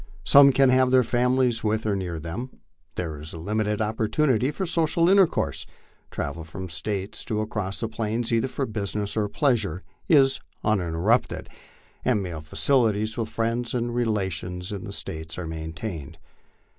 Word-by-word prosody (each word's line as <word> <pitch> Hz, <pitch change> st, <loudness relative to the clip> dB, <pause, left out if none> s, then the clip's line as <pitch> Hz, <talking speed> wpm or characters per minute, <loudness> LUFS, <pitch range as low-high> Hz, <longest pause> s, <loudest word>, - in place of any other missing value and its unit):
Some 140 Hz, 0 st, +8 dB
can 135 Hz, 0 st, +4 dB
have 130 Hz, 0 st, +4 dB
their 130 Hz, 0 st, +5 dB
families 125 Hz, 0 st, +1 dB
with 110 Hz, 0 st, 0 dB
or 105 Hz, -2 st, +1 dB
near 90 Hz, -4 st, -3 dB
them. 95 Hz, +11 st, -6 dB, 0.4 s
There 80 Hz, -4 st, -4 dB
is 75 Hz, -, -7 dB
a -, -, -7 dB
limited 105 Hz, +4 st, -1 dB
opportunity 110 Hz, +4 st, +1 dB
for 190 Hz, +6 st, -3 dB
social 165 Hz, 0 st, +2 dB
intercourse; 190 Hz, -2 st, +3 dB, 0.4 s
travel 75 Hz, +3 st, -4 dB
from 80 Hz, +4 st, -7 dB
the 90 Hz, -, -9 dB
States, 95 Hz, +4 st, -3 dB
to 110 Hz, -, -2 dB
and -, -, +1 dB
across 100 Hz, -2 st, -3 dB
the 115 Hz, -, 0 dB
Plains, 115 Hz, +2 st, -2 dB
either 115 Hz, +3 st, +2 dB
for 135 Hz, +1 st, -2 dB
business 105 Hz, -2 st, -3 dB
or 105 Hz, -2 st, 0 dB
pleasure, 105 Hz, -, 0 dB, 0.3 s
is 135 Hz, -4 st, +5 dB, 0.2 s
uninterrupted, 100 Hz, +2 st, +1 dB, 0.5 s
and 100 Hz, -, +2 dB
mail 85 Hz, -4 st, -5 dB
facilities 110 Hz, -, +1 dB
with 115 Hz, -2 st, -2 dB
friends 115 Hz, +2 st, -1 dB
and 120 Hz, -1 st, -1 dB
relations 95 Hz, -5 st, -1 dB
in 100 Hz, -2 st, -5 dB
the -, -, -6 dB
States 80 Hz, 0 st, -5 dB
are 90 Hz, -, -4 dB
maintained. 80 Hz, 0 st, -6 dB
110 Hz, 160 wpm, -25 LUFS, 90-125 Hz, 0.5 s, Some